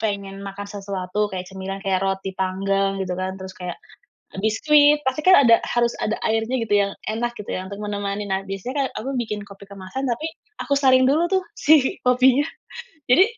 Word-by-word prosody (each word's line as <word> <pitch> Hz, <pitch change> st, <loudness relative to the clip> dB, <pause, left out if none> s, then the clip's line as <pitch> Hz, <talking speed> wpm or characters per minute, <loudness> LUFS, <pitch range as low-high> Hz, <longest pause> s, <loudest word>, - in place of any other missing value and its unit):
pengen 200 Hz, -2 st, -3 dB
makan 200 Hz, +1 st, -7 dB
sesuatu 200 Hz, 0 st, -3 dB
kayak 185 Hz, -1 st, -5 dB
cemilan 190 Hz, 0 st, -6 dB
kayak 190 Hz, -1 st, +1 dB
roti 195 Hz, 0 st, -2 dB
panggang 195 Hz, +1 st, 0 dB
gitu 185 Hz, -2 st, -2 dB
kan, 185 Hz, +1 st, -4 dB
terus 190 Hz, 0 st, -8 dB
kayak 180 Hz, -1 st, -6 dB, 0.7 s
biskuit, 295 Hz, +7 st, +4 dB
pasti 265 Hz, +4 st, 0 dB
kan 370 Hz, +2 st, +7 dB
ada 230 Hz, -, +8 dB
harus 240 Hz, 0 st, +1 dB
ada 215 Hz, -, -1 dB
airnya 225 Hz, +3 st, 0 dB
gitu 225 Hz, -3 st, -1 dB
yang 200 Hz, -, -2 dB, 0.2 s
enak 230 Hz, +2 st, -1 dB
gitu 210 Hz, -, -9 dB
ya 185 Hz, -, -3 dB
untuk 200 Hz, -, -7 dB
menemani, 205 Hz, 0 st, -3 dB
nah 190 Hz, 0 st, -1 dB
biasanya 195 Hz, +6 st, -5 dB
kayak, -, -, -3 dB
aku 255 Hz, -, -4 dB
bikin 210 Hz, -2 st, -4 dB
kopi 200 Hz, 0 st, -13 dB
kemasan 200 Hz, +7 st, -6 dB
tapi 240 Hz, +7 st, -2 dB, 0.4 s
aku 285 Hz, -, 0 dB
saring 260 Hz, -2 st, +5 dB
dulu 300 Hz, +5 st, +3 dB
tuh 380 Hz, -1 st, +2 dB
si 295 Hz, -3 st, +3 dB
kopinya. 255 Hz, +2 st, +4 dB, 0.7 s
Jadi 360 Hz, +9 st, +7 dB
205 Hz, 185 wpm, -22 LUFS, 195-250 Hz, 0.7 s, ada